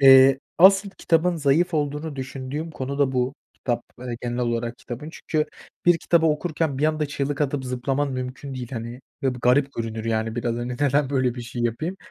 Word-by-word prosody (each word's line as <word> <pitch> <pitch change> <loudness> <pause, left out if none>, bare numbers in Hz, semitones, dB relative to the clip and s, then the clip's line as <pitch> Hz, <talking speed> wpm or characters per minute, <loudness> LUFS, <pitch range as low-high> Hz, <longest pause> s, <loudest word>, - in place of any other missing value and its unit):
Eee, 135 0 +8 0.2
asıl 195 +2 +7
kitabın 175 -1 +1
zayıf 160 +4 +2
olduğunu 150 0 -2
düşündüğüm 135 +4 -5
konu 140 -1 -4
da 135 -2 +3
bu, 125 +2 0 0.2
kitap 120 -2 -2 0.4
genel 120 0 -3
olarak 120 0 -1
kitabın. 135 +6 -7
Çünkü 155 -2 -1 0.4
bir 175 -1 +6
kitabı 165 0 +3
okurken 155 -2 0
bir 150 - +1
anda 155 -1 +1
çığlık 145 0 -2
atıp 140 -2 0
zıplaman 130 +3 -1
mümkün 130 +2 -5
değil, 125 -2 -5
hani, 115 +1 -5 0.2
ve 130 -2 +1
bu - - -8
garip 135 +3 +4
görünür, 115 -1 -4
yani, 110 0 -1
biraz, 120 -1 -1
hani, 120 +1 -3
neden 140 +2 +1
böyle 130 -3 +1
bir 120 - -6
şey 120 0 -5
yapayım? 155 - -1
135 Hz, 185 wpm, -24 LUFS, 125-150 Hz, 0.4 s, Eee